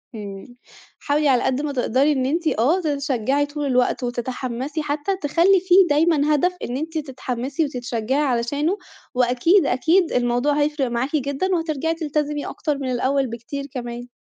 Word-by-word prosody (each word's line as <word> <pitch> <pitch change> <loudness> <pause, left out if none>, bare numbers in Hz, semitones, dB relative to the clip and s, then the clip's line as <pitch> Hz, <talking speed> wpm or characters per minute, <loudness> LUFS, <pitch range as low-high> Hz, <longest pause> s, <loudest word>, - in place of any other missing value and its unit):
إمم، 205 +3 -8 0.4
حاولي 295 +1 +1
على 255 -2 +3
قد 265 +2 0
ما 300 - -2
تقدري 265 +3 +2
إن 260 -3 0
أنتِ 325 +5 0
آه، 295 +11 +3
تتشجّعي 280 -3 0
طول 290 0 -5
الوقت 255 -1 +1
وتتحمّسي 250 +4 -3
حتّى، 300 +6 -1
تخلّي 340 +6 +4
فيه 370 0 +5
دايمًا 300 0 +3
هدف 360 +5 +1
إن 245 - -3
أنتِ 320 +3 -4
تتحمّسي 265 0 -3
وتتشجّعي 250 0 -2
علشانه، 285 +7 0 0.4
وأكيد، 255 +9 +3
أكيد 325 +7 +2
الموضوع 245 +3 +1
هيفرق 290 -3 0
معاكِ 240 +5 -2
جدًا، 280 +4 -1
وهترجعي 325 -1 -1
تلتزمي 300 -2 -2
أكتر 295 -2 -3
من 265 -2 -3
الأول 265 +2 +1
بكتير 235 +4 -6
كمان. 240 -2 -6
280 Hz, 150 wpm, -22 LUFS, 250-305 Hz, 0.4 s, فيه